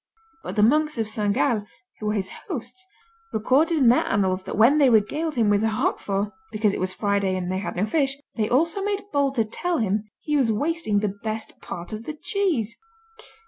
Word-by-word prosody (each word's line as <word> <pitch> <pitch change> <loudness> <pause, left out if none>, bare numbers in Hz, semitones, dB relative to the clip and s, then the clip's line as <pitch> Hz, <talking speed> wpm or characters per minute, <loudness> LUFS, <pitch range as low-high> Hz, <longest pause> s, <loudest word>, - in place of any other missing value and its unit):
But - - -5
the 210 - +3
monks 300 +5 +3
of 225 -2 -1
Saint 210 -1 -1
Gall, 230 -6 +1 0.3
who 215 - -4
were 210 - +1
his 195 -3 -2 0.2
hosts, 370 - -6 0.4
recorded 285 +9 +2
in 260 -5 +5
their 245 - +4
annals 190 -2 +1
that - - -5
when 245 +8 +6
they 275 -3 +6
regaled 290 +9 +1
him 230 -3 +2
with 205 0 +3
Roquefort 210 -3 0 0.2
(because 215 -2 +1
it - - -3
was 185 0 0
Friday 200 -1 0
and 180 0 -3
they 185 - -1
had 200 - -4
no 185 +4 +1
fish) 270 +3 +1 0.2
they 215 -2 0
also 330 +9 +2
made 405 0 -1
bold 280 -1 +1
to 225 -3 +2
tell 345 +10 -2
him 210 -1 0
he 300 - -2
was 260 -6 +3
wasting 220 -4 0
the 205 -2 -1
best 220 0 -4
part 175 +4 -7
of 215 +2 -6
the 310 - -5
cheese. 310 - 0
225 Hz, 205 wpm, -24 LUFS, 205-295 Hz, 0.4 s, when